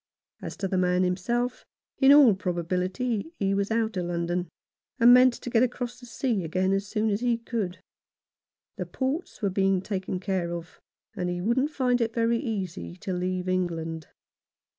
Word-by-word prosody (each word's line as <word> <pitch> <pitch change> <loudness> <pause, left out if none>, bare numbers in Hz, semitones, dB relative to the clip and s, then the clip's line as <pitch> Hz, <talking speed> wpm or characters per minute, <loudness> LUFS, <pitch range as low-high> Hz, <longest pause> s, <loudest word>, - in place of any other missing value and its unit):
As - - -7
to 195 - -2
the 185 0 0
man 180 0 +2
himself, 235 +7 -1 0.4
in 270 0 +7
all 285 -6 +8
probability 185 - -2
he 195 -1 0
was 200 0 0
out 225 -1 0
of 175 -1 -1
London, 175 0 -2 0.5
and 240 +1 +8
meant 250 -1 +6
to - - -7
get 230 - +4
across 245 0 -2
the 245 - -12
sea 230 -4 -1
again 185 +4 0
as 195 +1 -1
soon 215 +1 0
as 200 - 0
he 240 -2 +2
could. 215 -6 -4 1.0
The - - -4
ports 270 -1 -3
were 200 - +1
being 195 0 +2
taken 190 -1 -3
care 180 -3 -2
of, 170 0 -8 0.4
and 180 -1 -2
he 175 0 -2
wouldn't 235 +9 +1
find 250 -4 +1
it 230 0 -1
very 230 0 +2
easy 185 - -4
to 190 - -4
leave 180 0 -2
England. 165 -3 -2
195 Hz, 175 wpm, -27 LUFS, 180-235 Hz, 1.0 s, all